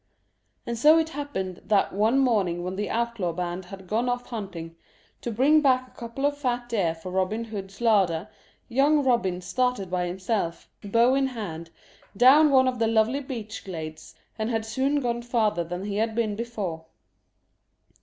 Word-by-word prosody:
And 235 -1 -3
so 305 +6 +7
it 320 -1 +1
happened 270 - -5
that 200 +1 +2
one 215 +6 +2
morning 200 -10 +1
when 185 +1 -4
the 205 +1 -3
outlaw 235 -7 -1
band 180 +1 -4
had 190 -1 -10
gone 225 +6 0
off 245 0 -2
hunting, 180 -8 -6 0.5
to - - -3
bring 275 +7 +4
back 255 -3 +3
a - - -22
couple 240 +3 -5
of 285 0 +1
fat 245 -4 -2
deer 185 -8 0
for 165 +3 -8
Robin 190 +5 0
Hood's 195 -3 -7
larder, 195 -6 +2 0.4
young 280 +4 +3
Robin 210 -9 +1
started 245 -1 -1
by 180 -1 0
himself, 185 -1 -2 0.2
bow 230 +5 +3
in 270 0 +2
hand, 175 -10 -6 0.5
down 280 +6 +7
one 260 -2 +5
of 250 -2 -1
the 225 - +2
lovely 225 +4 +2
beech 230 -7 -6
glades, 160 -4 -7 0.2
and 220 +1 -1
had 225 -2 -1
soon 265 +6 0
gone 240 -1 -1
farther 220 -7 +1
than 180 +3 -5
he 205 -1 -3
had 220 0 0
been 220 -3 0
before. 205 -8 -4
225 Hz, 175 wpm, -26 LUFS, 185-250 Hz, 0.5 s, so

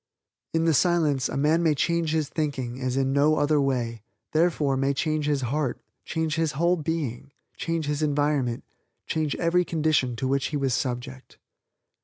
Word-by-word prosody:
In 165 0 +2
the 165 - +4
Silence 155 -4 +2
a - - -3
man 155 +4 +3
may 160 -3 +3
change 170 +2 0
his 155 -2 0
thinking 135 -5 -3
as 130 0 -1
in 135 0 +1
no 145 +2 +4
other 150 0 +2
way, 120 -5 -1 0.3
therefore, 155 -4 +2
may 135 +1 +1
change 155 +1 0
his 145 -2 +1
heart, 135 +2 -1 0.3
change 160 -1 -1
his 160 -2 0
whole 170 +5 +2
being, 150 -6 -3 0.2
change 165 -2 -2
his 145 +1 -2
environment, 145 -5 0 0.4
change 155 -2 -1
every 175 +1 +2
condition 155 -7 +1
to 130 +3 -2
which 135 0 +1
he 150 - -2
was 135 -2 0
subject. 130 +1 -4
145 Hz, 170 wpm, -26 LUFS, 135-160 Hz, 0.4 s, the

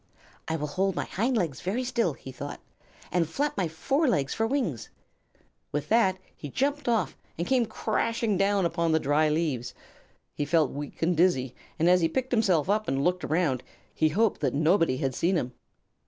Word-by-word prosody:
"I 160 - -1
will 150 -2 -2
hold 190 +5 0
my - - -1
hind 235 +5 0
legs 160 - -1
very 210 +8 -1
still," 235 - 0
he 135 - -10
thought, 145 +3 -7 0.5
"and 170 -2 +1
flap 290 - -1
my 185 -3 0
forelegs 160 - 0
for 225 0 0
wings." 230 - -2 0.8
With 145 0 -3
that 215 -5 +3 0.2
he 145 - -8
jumped 280 - -1
off 230 -2 +1 0.2
and 170 - -1
came 250 -1 +2
crashing 225 0 0
down 195 0 +2
upon 170 -1 +1
the 160 - +4
dry 150 +2 +2
leaves. 150 -6 -1 0.6
He - - -2
felt 155 -1 +2
weak 145 +3 -6
and 175 +2 +2
dizzy, 145 -7 +2 0.2
and 165 - +2
as 180 0 +5
he 165 - +2
picked 260 +8 -2
himself 190 - +2
up 215 +2 +1
and 135 +1 0
looked 180 +2 +1
around 155 -6 +1 0.3
he 155 - +2
hoped 210 +6 +1
that - - 0
nobody 160 -2 +3
had 135 0 -1
seen 175 +8 +1
him. 125 -7 -1
175 Hz, 185 wpm, -27 LUFS, 150-220 Hz, 0.8 s, as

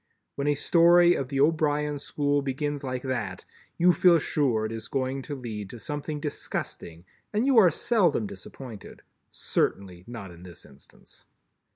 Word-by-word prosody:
When 140 +1 -3
a 145 - +3
Story 175 +3 +5
of 135 - -2
the 135 0 -3
O'Brien 150 -1 +1
school 145 0 0
begins 140 +1 -3
like 130 -1 -4
that, 110 -8 -4 0.3
you 175 +1 +5
feel 175 0 +5
sure 135 -8 0
it 110 - -4
is 115 0 -6
going 135 0 -2
to 145 +2 -6
lead 110 -6 -6
to 120 - -9
something 150 +4 -5
disgusting 85 - -5 0.3
and 215 +4 0
you 270 -4 +5
are 185 -5 +7
seldom 170 - +1
disappointed, 105 +3 -10 0.3
certainly 90 -3 -2
not 110 -6 -8
in 85 0 -14
this 90 -1 -11
instance. 70 -1 -17
140 Hz, 160 wpm, -27 LUFS, 110-150 Hz, 0.3 s, are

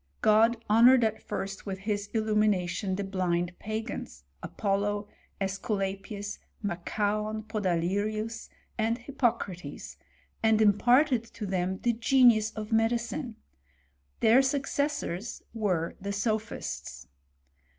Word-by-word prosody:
'' - - -42
'* - - -40
God 225 +2 +5
honoured 235 +4 +6
at 220 -1 0
first 195 0 -5
with 190 -1 -3
his 205 0 -2
illumination 210 -4 +1
the 200 - -2
blind 180 -3 -1
pagans, 215 - -5 0.2
Apollo, 205 0 -1 0.3
^sculapius, 195 +1 -3 0.2
Machaon, 210 +3 -1
Podalirius, 215 +2 -1 0.3
and 225 +1 +1
Hippo 245 -1 +1
cnrates, 180 -4 -8 0.4
and 220 -1 +4
imparted 240 +5 +4
to 230 -1 -7
them 190 -1 -1
the 240 - +3
genius 230 -2 +4
of 215 0 -6
medicine; 235 +2 0 0.9
their 230 +4 +6
successors 270 - -2
were 185 -7 -1
the 200 +1 -3
sophists." 200 - -3
215 Hz, 110 wpm, -29 LUFS, 195-225 Hz, 0.9 s, honoured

